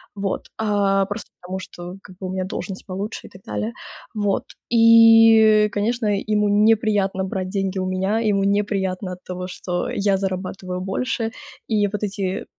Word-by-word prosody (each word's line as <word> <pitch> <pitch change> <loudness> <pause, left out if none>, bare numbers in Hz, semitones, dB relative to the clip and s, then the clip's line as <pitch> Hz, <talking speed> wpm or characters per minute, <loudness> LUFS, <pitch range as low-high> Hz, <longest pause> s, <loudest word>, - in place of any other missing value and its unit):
Вот, 200 -1 -3
а, 200 -2 +2
просто 205 0 -6
потому 185 +1 -5
что 180 -1 -9
как 185 - -14
бы 190 - -5
у - - -4
меня 190 0 -2
должность 195 0 -6
получше 200 +3 -5
и - - -15
так 190 - -15
далее. 105 +2 -3 0.4
Вот, 205 -2 0 0.3
и 225 -2 +7
конечно, 225 +2 -1 0.2
ему 210 -1 +1
неприятно 205 -2 +2
брать 185 -1 -3
деньги 195 -1 -2
у 185 - -2
меня, 190 +4 0
ему 205 -3 +1
неприятно 195 -2 -1
от 180 - -12
того, 180 0 -6
что 180 -1 -3
я 200 -1 +1
зарабатываю 185 -1 -4
больше 225 +4 -2 0.4
и 210 -2 +2
вот 210 +1 -5
эти 195 -2 -3
195 Hz, 160 wpm, -22 LUFS, 185-215 Hz, 0.4 s, и